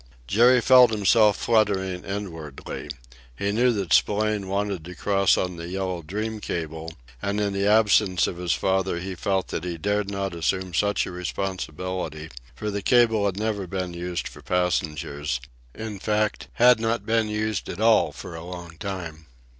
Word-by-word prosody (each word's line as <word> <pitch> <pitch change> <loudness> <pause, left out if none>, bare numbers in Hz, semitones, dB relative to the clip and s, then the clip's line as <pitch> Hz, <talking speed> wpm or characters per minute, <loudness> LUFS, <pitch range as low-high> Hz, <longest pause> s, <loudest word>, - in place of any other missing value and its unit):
Jerry 120 - +5
felt 125 0 +7
himself 105 0 +4
fluttering 95 -5 +1
inwardly. 80 -8 -6 0.5
He 100 - -1
knew 120 +4 +3
that 100 -6 -1
Spillane 105 -1 +2
wanted 100 -2 -2
to 90 +1 -9
cross 100 0 +2
on 90 -2 -2
the 85 0 -6
Yellow 95 -2 -3
Dream 105 +7 -4
cable, 80 -3 -5 0.3
and 100 +1 -1
in 100 -1 0
the 100 +1 0
absence 105 -3 +4
of 85 - -4
his 90 -1 0
father 95 -2 0
he 95 +2 -5
felt 95 +1 -1
that 80 - -3
he 90 -2 -4
dared 100 +4 -1
not 100 -2 -3
assume 90 +2 -1
such 100 +3 +1
a - - -6
responsibility, 90 -3 -4 0.3
for 105 -1 -3
the 100 0 -3
cable 115 -2 +4
had 95 -1 -3
never 105 -3 -2
been 90 -1 -3
used 85 0 -4
for - - -12
passengers; 75 -6 -1 0.4
in 110 -2 -6
fact, 105 0 -1
had 125 -1 +5
not 115 +1 -1
been 110 -1 +1
used 110 0 -2
at - - -6
all 110 0 +4
for - - -9
a 80 0 -7
long 85 -2 -9
time. 85 -6 -6
95 Hz, 170 wpm, -25 LUFS, 90-105 Hz, 0.5 s, felt